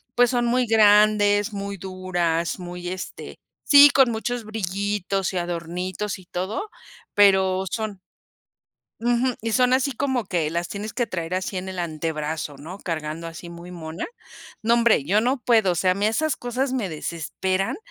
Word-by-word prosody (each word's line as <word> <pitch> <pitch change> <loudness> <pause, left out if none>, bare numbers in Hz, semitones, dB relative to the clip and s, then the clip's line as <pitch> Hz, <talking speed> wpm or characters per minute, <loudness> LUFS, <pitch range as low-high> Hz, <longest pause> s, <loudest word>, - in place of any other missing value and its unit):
pues, 245 0 +5
son 240 -1 +1
muy 245 +1 +2
grandes, 210 -1 +4
muy 200 0 -4
duras, 180 -3 -2
muy, 175 0 -6
este 185 0 -7 0.2
sí, 285 0 +8
con 265 -3 +5
muchos 235 +1 -3
brillitos 200 -2 -2
y - - -2
adornitos 175 +3 -3
y 185 - -16
todo, 190 - -4 0.4
pero 190 -2 +4
son 215 -3 -3 1.0
Ujú, 240 +2 +1
y 225 0 -2
son 250 +1 +3
así 270 +1 +1
como 260 -1 -1
que 170 -5 -1
las 170 +1 -2
tienes 210 +1 -5
que 240 -2 -1
traer 175 -4 -4
así 185 +1 -3
en 185 +1 -4
el 185 -1 -6
antebrazo, 155 -2 -3
¿no?, 165 +7 -9
cargando 160 0 -4
así 165 +1 -9
muy 170 +1 -10
mona, 165 +1 -6 0.6
no 230 +2 +3
hombre, 235 -11 +3
yo 200 +8 +3
no 250 +4 +1
puedo, 225 -6 +3
o - - -2
sea, 185 +3 +3
a - - -3
mí 200 +2 0
esas 290 +7 +1
cosas 250 +2 -2
me 240 -7 -1
desesperan 175 +4 -2
195 Hz, 170 wpm, -23 LUFS, 175-225 Hz, 1.0 s, sí